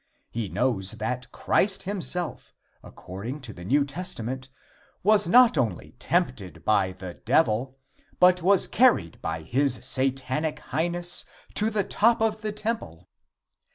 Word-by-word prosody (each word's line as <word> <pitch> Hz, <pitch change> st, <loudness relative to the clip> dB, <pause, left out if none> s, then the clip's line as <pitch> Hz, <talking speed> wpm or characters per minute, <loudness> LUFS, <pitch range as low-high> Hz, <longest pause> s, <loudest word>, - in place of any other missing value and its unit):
He 110 Hz, -4 st, -3 dB
knows 115 Hz, -5 st, 0 dB
that 125 Hz, +2 st, -4 dB
Christ 195 Hz, 0 st, +1 dB
himself, 180 Hz, -3 st, -3 dB, 0.3 s
according 100 Hz, -, -8 dB
to 120 Hz, -4 st, -8 dB
the 90 Hz, -, -11 dB
New 140 Hz, +9 st, +2 dB
Testament, 130 Hz, -5 st, -5 dB, 0.5 s
was 210 Hz, 0 st, +4 dB
not 245 Hz, +5 st, +6 dB
only 110 Hz, -9 st, -2 dB
tempted 125 Hz, -, -2 dB
by 100 Hz, -3 st, +2 dB
the 90 Hz, -1 st, -8 dB
Devil, 125 Hz, 0 st, +1 dB, 0.4 s
but 180 Hz, 0 st, +5 dB
was 190 Hz, +2 st, +5 dB
carried 230 Hz, -, +2 dB
by 80 Hz, 0 st, -4 dB
his 130 Hz, -, +1 dB
Satanic 135 Hz, +3 st, -1 dB
Highness 175 Hz, +2 st, -1 dB, 0.3 s
to 215 Hz, +2 st, +2 dB
the 210 Hz, -2 st, 0 dB
top 225 Hz, +4 st, +2 dB
of 220 Hz, -1 st, 0 dB
the 215 Hz, -1 st, -3 dB
temple. 205 Hz, -, -5 dB
135 Hz, 130 wpm, -26 LUFS, -, 0.5 s, not